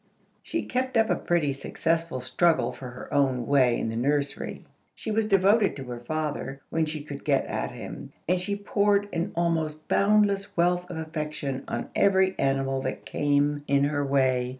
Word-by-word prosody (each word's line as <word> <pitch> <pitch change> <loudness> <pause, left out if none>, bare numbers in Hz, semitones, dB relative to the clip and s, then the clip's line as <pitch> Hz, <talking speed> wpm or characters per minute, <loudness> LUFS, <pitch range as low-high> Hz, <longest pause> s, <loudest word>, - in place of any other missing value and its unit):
She - - -3
kept 255 0 -1
up 220 -3 +3
a - - +3
pretty 165 -6 0
successful 165 +1 -1
struggle 130 +1 +2
for 130 - -8
her 125 +1 -9
own 130 -4 +2
way 130 -3 +3
in - - -1
the 115 - -4
nursery. 140 +4 -1 0.3
She 220 - -5
was 215 0 +1
devoted 200 +1 +4
to 135 - -6
her 125 -2 -6
father, 145 0 -3
when 160 -1 +1
she 155 -1 -4
could 145 -1 -8
get - - +2
at - - -3
him, - - -8 0.2
and 180 +2 +2
she 200 +3 -2
poured 205 0 +1
an 175 +4 -1
almost 160 -2 -1
boundless 200 -1 +2
wealth 180 +1 +2
of 175 - -5
affection 155 -4 -4
on - - -4
every 190 -1 +3
animal 135 -1 +1
that - - -4
came 145 0 +1
in 140 0 +3
her 145 0 +1
way. 130 -3 +2
155 Hz, 175 wpm, -27 LUFS, 135-185 Hz, 0.3 s, devoted